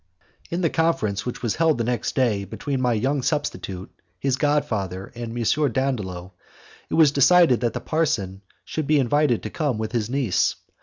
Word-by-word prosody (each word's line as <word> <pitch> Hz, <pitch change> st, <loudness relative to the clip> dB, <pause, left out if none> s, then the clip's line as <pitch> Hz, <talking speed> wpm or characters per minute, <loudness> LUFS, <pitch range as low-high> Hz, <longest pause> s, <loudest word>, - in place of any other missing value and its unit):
In 170 Hz, +2 st, -2 dB
the 165 Hz, -, +2 dB
conference 125 Hz, -11 st, 0 dB
which 125 Hz, -, -5 dB
was 115 Hz, -, -1 dB
held 160 Hz, -3 st, +3 dB
the 115 Hz, -, 0 dB
next 120 Hz, +1 st, -2 dB
day 115 Hz, -7 st, +1 dB
between 130 Hz, +7 st, -4 dB
my 125 Hz, -1 st, +2 dB
young 135 Hz, +6 st, 0 dB
substitute, 95 Hz, -, -3 dB, 0.3 s
his 135 Hz, -2 st, +1 dB
god 145 Hz, +1 st, +1 dB
father, 95 Hz, -3 st, -4 dB
and 120 Hz, 0 st, -6 dB
M. 135 Hz, +4 st, +1 dB
Dandolo, 100 Hz, -9 st, -2 dB, 0.6 s
it -, -, -1 dB
was 155 Hz, -3 st, +6 dB
decided 150 Hz, -1 st, +5 dB
that 120 Hz, -2 st, -1 dB
the -, -, -4 dB
parson 100 Hz, -, -1 dB, 0.2 s
should 155 Hz, -3 st, -3 dB
be 155 Hz, -, +4 dB
invited 135 Hz, -1 st, +2 dB
to 110 Hz, -, -5 dB
come 145 Hz, -8 st, -1 dB
with 110 Hz, 0 st, -3 dB
his 115 Hz, -3 st, -1 dB
niece. 130 Hz, -7 st, +1 dB
125 Hz, 185 wpm, -23 LUFS, 110-145 Hz, 0.6 s, was